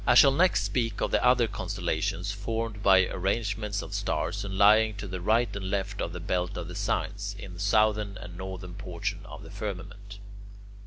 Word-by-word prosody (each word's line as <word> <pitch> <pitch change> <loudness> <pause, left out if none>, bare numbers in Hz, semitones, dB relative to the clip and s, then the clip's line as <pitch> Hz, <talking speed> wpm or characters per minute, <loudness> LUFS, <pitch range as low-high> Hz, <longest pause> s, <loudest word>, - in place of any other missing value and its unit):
I 120 - +6
shall 135 +2 +8
next 180 +7 +3
speak 115 -4 -1
of - - 0
the - - +2
other 125 -1 +5
constellations 100 - -2
formed 115 -2 -3
by 95 -2 +6
arrangements 105 +2 -2
of - - -8
stars, - - -1
and 95 -1 -4
lying 110 +1 +5
to 100 +1 -6
the 90 -1 -5
right 115 +5 +2
and 95 -2 -4
left 100 +1 -2
of 85 - -2
the 90 - -6
belt 90 +2 -2
of 85 -2 -5
the 90 - -7
signs, 100 +3 -2
in 100 -2 -9
the 90 - -10
southern 105 0 +2
and 90 0 -9
northern 95 -1 -7
portions 90 -3 -4
of - - -10
the - - -11
firmament. 100 0 -7
100 Hz, 195 wpm, -28 LUFS, 95-110 Hz, -, shall